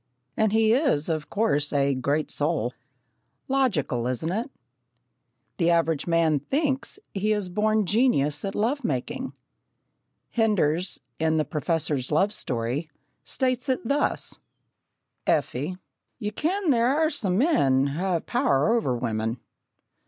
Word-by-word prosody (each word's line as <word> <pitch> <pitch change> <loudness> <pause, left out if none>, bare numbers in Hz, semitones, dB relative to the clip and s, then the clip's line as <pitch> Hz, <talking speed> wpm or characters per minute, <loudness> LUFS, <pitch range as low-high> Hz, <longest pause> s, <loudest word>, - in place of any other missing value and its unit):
And 220 -2 +2
he 220 0 +4
is, 245 - +2
of 155 -2 -2
course, 150 -10 +1
"a 140 -1 +2
great 140 +4 -1
soul." 145 -5 0 0.7
Logical, 190 - +1
isn't 130 +7 -2
it? 225 +8 -2 1.1
The 170 - +2
average 165 -3 +1
man 165 -3 +3
thinks 270 - -1
that 410 - -9
he 210 +2 +1
is 205 -3 -2
a - - -12
born 215 +2 +2
genius 190 - +2
at 195 -1 -3
love 255 +7 0
making. 235 - -3 1.0
Henders, 185 -6 +1 0.2
in 160 0 +2
The 155 - +1
Professor's 150 -4 -1
Love 195 +7 +3
Story, 130 - -3 0.3
states 255 -1 -1
it 255 -3 -1
thus: 285 +3 0 0.9
"Effie, 150 +5 0 0.4
ye 210 0 -3
ken 340 - 0
there 235 -2 +3
are 315 0 +2
some 190 - -1
men 140 - +3
ha' 185 +2 0
a 165 - -1
power 235 - +2
o'er 130 - 0
women.... 115 0 -2
180 Hz, 135 wpm, -26 LUFS, 145-235 Hz, 1.1 s, he